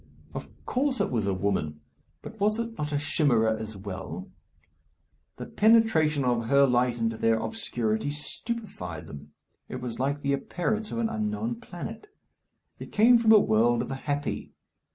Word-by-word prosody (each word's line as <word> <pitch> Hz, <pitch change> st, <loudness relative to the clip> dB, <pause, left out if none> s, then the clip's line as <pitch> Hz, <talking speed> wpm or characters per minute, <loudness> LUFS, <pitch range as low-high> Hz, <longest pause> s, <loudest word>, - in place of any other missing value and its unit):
Of -, -, -6 dB, 0.2 s
course 265 Hz, 0 st, 0 dB
it -, -, 0 dB
was 110 Hz, -5 st, 0 dB
a 100 Hz, -, +1 dB
woman, 95 Hz, -6 st, -1 dB, 0.4 s
but 220 Hz, -, -10 dB
was 210 Hz, +2 st, +2 dB
it 230 Hz, 0 st, -3 dB
not 150 Hz, -5 st, -3 dB
a 145 Hz, -, +1 dB
chimera 125 Hz, -7 st, +2 dB
as 110 Hz, -1 st, -6 dB
well? 95 Hz, -3 st, -7 dB, 1.1 s
The -, -, -6 dB
penetration 185 Hz, -, +3 dB
of 120 Hz, -2 st, +1 dB
her 140 Hz, +1 st, +6 dB
light 125 Hz, -1 st, +2 dB
into 115 Hz, -1 st, -1 dB
their 115 Hz, 0 st, +3 dB
obscurity 115 Hz, -, -2 dB
stupefied 150 Hz, -, -5 dB
them. 75 Hz, +1 st, -11 dB, 0.4 s
It 130 Hz, -, -5 dB
was 125 Hz, -2 st, -5 dB
like 140 Hz, +2 st, -1 dB
the 140 Hz, 0 st, +1 dB
appearance 210 Hz, +10 st, -2 dB
of -, -, -3 dB
an 230 Hz, -1 st, +1 dB
unknown 225 Hz, +1 st, -2 dB
planet. 225 Hz, -, -8 dB, 0.7 s
It -, -, -9 dB
came 235 Hz, +3 st, +6 dB
from 225 Hz, -1 st, +4 dB
a 220 Hz, -, +10 dB
world 120 Hz, -, +3 dB
of -, -, -7 dB
the 135 Hz, -, -3 dB
happy. 145 Hz, 0 st, -2 dB
140 Hz, 165 wpm, -27 LUFS, -, 1.1 s, a